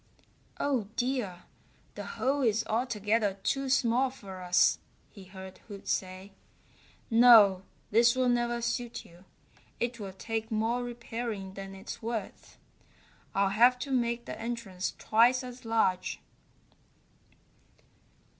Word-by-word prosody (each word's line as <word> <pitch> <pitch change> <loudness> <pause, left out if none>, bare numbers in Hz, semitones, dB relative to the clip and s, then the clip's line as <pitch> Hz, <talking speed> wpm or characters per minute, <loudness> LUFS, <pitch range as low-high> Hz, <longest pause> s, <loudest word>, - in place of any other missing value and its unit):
"Oh, 260 -8 0
dear, 240 -8 -2 0.5
the - - -7
hole 275 +2 +1
is 225 -3 +1
altogether 215 -3 0
too 275 -1 0
small 255 0 +2
for 195 -7 -10
us," 180 0 +3 0.3
he 195 -3 -13
heard 190 0 -11
Hoot 200 -3 -10
say. 185 +1 -3 0.8
"No, 225 -5 +7 0.3
this 235 +3 +5
will 255 -1 +2
never 240 -1 0
suit 240 0 -3
you. 175 +2 -18 0.5
It 240 0 -2
will 195 -2 -6
take 220 +3 -4
more 230 +2 0
repairing 230 -4 -5
than 195 0 -8
it's 195 - -8
worth. 225 -3 -6 0.8
I'll 195 0 +3
have 240 +5 +5
to 275 +2 -5
make 235 -2 0
the - - -7
entrance 230 -6 -4
twice 240 +4 +3
as 250 -1 -10
large." 205 -5 0
230 Hz, 120 wpm, -29 LUFS, 195-240 Hz, 0.8 s, No